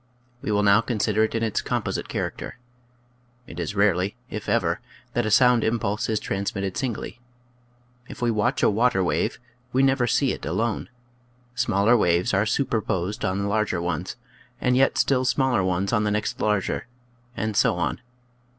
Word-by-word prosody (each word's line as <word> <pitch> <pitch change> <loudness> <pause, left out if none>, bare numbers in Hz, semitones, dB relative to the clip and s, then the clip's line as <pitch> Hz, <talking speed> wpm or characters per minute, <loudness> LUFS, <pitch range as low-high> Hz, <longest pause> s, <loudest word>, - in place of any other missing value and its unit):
We - - -3
will 105 0 +2
now 100 +2 +5
consider 110 -2 +1
it 110 - -5
in 115 - 0
its 110 -2 0
composite - - -3
character. - - -4 0.9
It 85 -7 -9
is 85 +4 -3
rarely, 100 0 +2 0.2
if 105 - -5
ever, - - +1 0.3
that 120 -2 0
a - - 0
sound 125 +1 +5
impulse 110 -1 -1
is 110 -1 +1
transmitted 100 -1 -3
singly. 120 -2 -4 0.9
If - - -9
we 120 -1 +1
watch 115 +5 0
a - - +6
water 110 -3 +2
wave - - 0 0.3
we 130 +1 +2
never 135 -2 +3
see 135 +2 +2
it - - -6
alone. 115 -2 -2 0.6
Smaller 115 -2 +3
waves 90 -4 +2
are 100 +2 +2
superposed 105 -6 -1
on 95 +2 0
the - - -1
larger 105 -3 0
ones, 85 +1 -3 0.4
and 125 0 +2
yet 135 +1 +3
still 130 -2 +2
smaller 125 -4 +2
ones 95 +3 0
on 105 -2 +2
the 105 - +1
next 105 0 -2
larger 105 +1 0 0.5
and 110 +1 -2
so - - +3
on. 85 +5 -2
105 Hz, 170 wpm, -24 LUFS, 100-120 Hz, 0.9 s, a